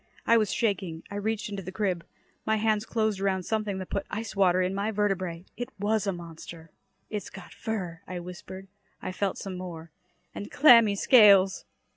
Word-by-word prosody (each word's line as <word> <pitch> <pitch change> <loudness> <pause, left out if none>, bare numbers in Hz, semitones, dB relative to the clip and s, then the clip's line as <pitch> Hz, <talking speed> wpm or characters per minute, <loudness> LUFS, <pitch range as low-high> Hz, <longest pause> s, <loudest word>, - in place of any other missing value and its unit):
I 230 - +5
was 215 -3 +2
shaking. 190 -7 -1
I - - -5
reached 220 +2 -2
into 200 -1 -5
the 185 0 -7
crib. 190 -4 -1 0.4
My 220 - +1
hands 215 0 0
closed 220 -3 0
around 190 -2 0
something 215 -1 -2
that 185 -1 -7
put 200 - -2
ice 220 +1 -5
water 185 -2 +3
in 185 +1 -1
my 200 +2 -1
vertebrae. 190 -5 -1
It 245 - -5
was 210 +1 0
a - - +2
monster. 165 -2 -10 0.4
"It's 210 -2 -4
got 195 -2 -12
fur!" 180 -7 -4
I 185 - -5
whispered. 180 +2 -9 0.3
I - - -5
felt 195 +1 -2
some 185 -2 -6
more. 170 -3 -8 0.4
"And 205 - -7
clammy 230 -7 +6
scales!" 200 -4 +6
195 Hz, 180 wpm, -27 LUFS, 185-215 Hz, 0.4 s, clammy